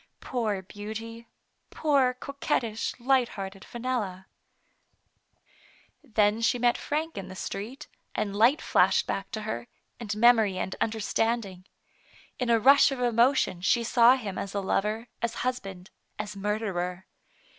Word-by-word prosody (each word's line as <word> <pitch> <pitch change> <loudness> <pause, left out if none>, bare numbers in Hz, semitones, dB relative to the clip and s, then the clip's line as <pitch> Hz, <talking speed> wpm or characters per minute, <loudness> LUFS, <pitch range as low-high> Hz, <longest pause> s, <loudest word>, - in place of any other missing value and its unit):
.Poor 215 -6 -2
beauty! 220 +4 -8 0.4
poor 275 -5 +2
coquettish, 255 -4 -2
light 255 0 +2
hearted 195 0 -6
Fenella! 230 -7 -4 1.8
Then 215 0 +1
she 230 - +2
met 240 0 +3
Frank 310 -4 -3
in 190 - -7
the 185 - -9
street, 235 +10 -6 0.3
and 205 -2 -2
light 235 +8 +4
flashed - - +3
back 195 - -3
to 220 -2 -5
her, 220 +2 -4 0.3
and 210 -3 -4
memory 220 -4 +5
and 185 - -3
understand 225 +1 0
ing. 185 -1 -12 0.7
In 250 -2 -1
a 230 -1 +4
rush 275 +4 +6
of 270 - -4
emotion 240 -5 +2
she 235 +6 +2
saw 235 +2 +6
him 210 -7 -5
as 200 0 -5
a - - +1
lover, 210 +4 -1
as 235 -1 -1
husband, 195 -7 -4 0.3
as 210 0 -5
Murderer. 195 -3 -2
225 Hz, 135 wpm, -27 LUFS, 200-245 Hz, 1.8 s, rush